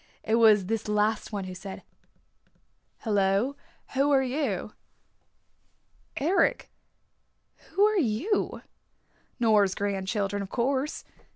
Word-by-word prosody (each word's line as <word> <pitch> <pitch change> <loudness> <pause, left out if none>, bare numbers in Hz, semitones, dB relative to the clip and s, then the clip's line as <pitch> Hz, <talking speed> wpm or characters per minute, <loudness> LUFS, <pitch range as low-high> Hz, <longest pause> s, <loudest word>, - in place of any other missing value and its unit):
It 220 - -2
was 220 -4 +5
this 225 +2 -2
last 210 +1 0
one 205 -2 -3
who 185 0 -7
said, 190 +1 -8 1.2
"Hello, 205 +4 +1 0.4
who 275 +2 +2
are 270 -2 +4
you?" 250 - -2 1.4
"Eric, 335 +7 +1 1.0
who 405 - +5
are 425 -1 +2
you?" 295 - -1 0.8
"Nora's 210 -5 +3
grandchildren, 200 0 -2
of 195 - -6
course. 265 +5 -1
220 Hz, 100 wpm, -27 LUFS, 200-270 Hz, 1.4 s, was